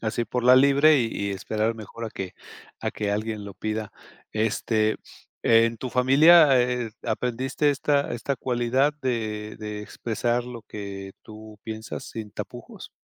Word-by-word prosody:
así 115 Hz, +1 st, -1 dB
por 125 Hz, +1 st, -3 dB
la 125 Hz, +1 st, +7 dB
libre 140 Hz, +3 st, +6 dB
y -, -, +1 dB
y 100 Hz, 0 st, -2 dB
esperar 110 Hz, +4 st, -1 dB
mejor 115 Hz, +1 st, -7 dB
a -, -, -4 dB
que 95 Hz, -3 st, -6 dB, 0.5 s
a -, -, -2 dB
que 105 Hz, -1 st, -3 dB
alguien 105 Hz, 0 st, -3 dB
lo 100 Hz, -, -8 dB
pida. 110 Hz, +1 st, -4 dB, 0.4 s
Este, 110 Hz, 0 st, +1 dB, 0.5 s
¿en 115 Hz, 0 st, +4 dB
tu 125 Hz, +3 st, -6 dB
familia, 140 Hz, +3 st, +6 dB
eh 125 Hz, 0 st, +1 dB
eh, -, -, -9 dB
aprendiste 125 Hz, +5 st, -1 dB
esta 145 Hz, 0 st, +1 dB
esta 130 Hz, +4 st, -2 dB
cualidad 125 Hz, +4 st, +1 dB
de 110 Hz, -4 st, -3 dB
de 105 Hz, -1 st, -5 dB
expresar 120 Hz, +3 st, -2 dB
lo 120 Hz, -2 st, -8 dB
que 100 Hz, -2 st, -7 dB
tú 110 Hz, -1 st, -12 dB
piensas 110 Hz, 0 st, -6 dB
sin 110 Hz, -2 st, -7 dB
tapujos? -, -, -9 dB
115 Hz, 155 wpm, -25 LUFS, 110-125 Hz, 0.5 s, la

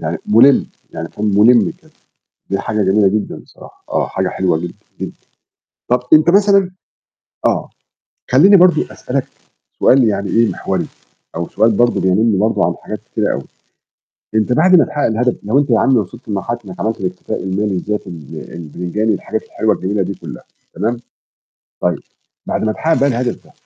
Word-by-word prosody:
يعني -, -, -3 dB
مُلِم، 120 Hz, +6 st, +5 dB, 0.3 s
يعني 80 Hz, -, -5 dB
أكون 105 Hz, -, -4 dB
مُلِم 120 Hz, +9 st, +5 dB
كده، 155 Hz, -, -22 dB, 0.6 s
دي 100 Hz, -, 0 dB
حاجة 105 Hz, -1 st, -1 dB
جميلة 100 Hz, +1 st, +3 dB
جدًا 105 Hz, +2 st, -2 dB
بصراحة. -, -, -16 dB
آه، -, -, 0 dB
حاجة 95 Hz, -1 st, -2 dB
حلوة 90 Hz, -3 st, 0 dB
جدًا، 85 Hz, +2 st, -5 dB, 0.3 s
جدًا. -, -, -4 dB, 0.8 s
طب 125 Hz, +1 st, +2 dB
أنت 155 Hz, +2 st, +6 dB
مثلًا 200 Hz, -1 st, +4 dB, 0.8 s
آه. -, -, -1 dB, 0.6 s
خلّيني 185 Hz, +11 st, +7 dB
برضو 180 Hz, 0 st, +5 dB
أسألك -, -, -3 dB, 0.5 s
سؤال 130 Hz, 0 st, +5 dB
يعني 100 Hz, -3 st, 0 dB
إيه 115 Hz, 0 st, +3 dB
محوري، -, -, -2 dB, 0.5 s
أو 85 Hz, 0 st, -3 dB
سؤال 110 Hz, +3 st, +2 dB
برضو 120 Hz, +3 st, +2 dB
بيَنُم 100 Hz, +3 st, +2 dB
برضو 110 Hz, +2 st, +1 dB
عن -, -, +1 dB
حاجات -, -, -6 dB
كتيرة -, -, 0 dB
أوي. -, -, -4 dB, 0.9 s
أنت 110 Hz, +3 st, +1 dB
بعد 180 Hz, +7 st, +5 dB
ما 165 Hz, -, +5 dB
تحقق 150 Hz, -2 st, -3 dB
الهدف 120 Hz, +2 st, +1 dB
لو 110 Hz, +7 st, +1 dB
أنت 140 Hz, -2 st, +1 dB
يا 115 Hz, -, +4 dB
عم 135 Hz, +2 st, +3 dB
وصلت 115 Hz, +3 st, -4 dB
لمرحلة 105 Hz, +3 st, -2 dB
إنك 90 Hz, -2 st, -9 dB
عملت 110 Hz, +1 st, -2 dB
الاكتفاء 90 Hz, -1 st, -4 dB
المالي 95 Hz, +2 st, -1 dB
الذاتي 105 Hz, +3 st, -3 dB
ال 80 Hz, -5 st, -9 dB
البتنجاني 90 Hz, +6 st, -3 dB
والحاجات 110 Hz, -, -3 dB
الحلوة 110 Hz, -1 st, 0 dB
الجميلة 100 Hz, +2 st, -1 dB
دي 95 Hz, +2 st, -3 dB
كلّها، -, -, -10 dB, 0.3 s
تمام؟ 110 Hz, +5 st, -1 dB, 0.9 s
طيب. -, -, +1 dB, 0.5 s
بعد -, -, -1 dB
ما 110 Hz, -, +1 dB
تحقق 160 Hz, +8 st, 0 dB
بقى 140 Hz, -, +3 dB
الهدف 125 Hz, -1 st, -2 dB
ده، -, -, -21 dB
110 Hz, 170 wpm, -17 LUFS, 95-125 Hz, 0.9 s, خلّيني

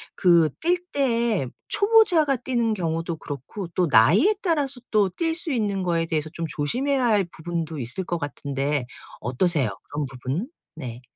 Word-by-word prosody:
그 170 Hz, -3 st, +5 dB
뛸 350 Hz, +2 st, +3 dB
때에 235 Hz, -, +1 dB, 0.2 s
초보자가 405 Hz, -9 st, +4 dB
뛰는 235 Hz, -3 st, 0 dB
경우도 165 Hz, -2 st, -2 dB
그렇고 145 Hz, -, -7 dB
또 175 Hz, +1 st, +1 dB
나이에 190 Hz, -, +5 dB
따라서 290 Hz, -8 st, 0 dB
또 210 Hz, -3 st, +3 dB
뛸 325 Hz, -, -1 dB
수 330 Hz, -1 st, -3 dB
있는 205 Hz, -6 st, 0 dB
거에 170 Hz, -2 st, 0 dB
대해서 155 Hz, -1 st, -2 dB
좀 165 Hz, -, -3 dB
조심해야 255 Hz, -, 0 dB
할 215 Hz, -4 st, +3 dB
부분도 165 Hz, -2 st, -5 dB
있을 125 Hz, +9 st, -3 dB
것 175 Hz, -1 st, -3 dB
같은데 140 Hz, -1 st, -2 dB, 0.4 s
어떠세요? 130 Hz, -, +1 dB, 0.2 s
그런 145 Hz, 0 st, -2 dB
부분? 135 Hz, -, -4 dB, 0.3 s
네. 125 Hz, -6 st, -7 dB
175 Hz, 305 characters per minute, -24 LUFS, -, 0.4 s, 그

